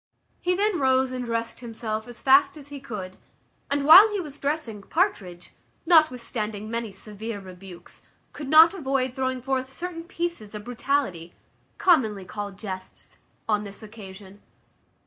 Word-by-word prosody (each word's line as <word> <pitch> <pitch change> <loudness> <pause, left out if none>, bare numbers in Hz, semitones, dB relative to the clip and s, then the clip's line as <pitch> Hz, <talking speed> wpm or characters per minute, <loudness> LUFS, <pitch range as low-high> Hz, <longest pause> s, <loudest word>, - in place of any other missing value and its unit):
He 360 0 0
then 410 -1 +1
rose 260 -1 +2
and 255 -1 -4
dressed 230 -1 -3
himself 220 -2 -5
as 240 -1 -11
fast 275 +3 +5
as 285 -1 -11
he 285 -1 -7
could; 210 -9 -7 0.5
and 285 0 0
while 370 +9 +10
he 410 - -1
was 295 -5 -7
dressing, 280 -8 -3
Partridge, 195 - -2 0.3
notwithstanding 235 - +2
many 230 -2 -3
severe 210 +2 -7
rebukes, 185 -1 -10 0.3
could 290 -2 -7
not 320 +3 +8
avoid 270 -7 -1
throwing 260 -1 -2
forth 260 0 -2
certain 335 +2 -6
pieces 340 - -4
of 210 - -6
brutality, 245 - -2 0.4
commonly 220 - +2
called 205 0 -6
jests, 190 -3 -9 0.3
on 210 -1 +1
this 200 +1 -8
occasion. 200 -2 -12
245 Hz, 145 wpm, -25 LUFS, 210-290 Hz, 0.5 s, while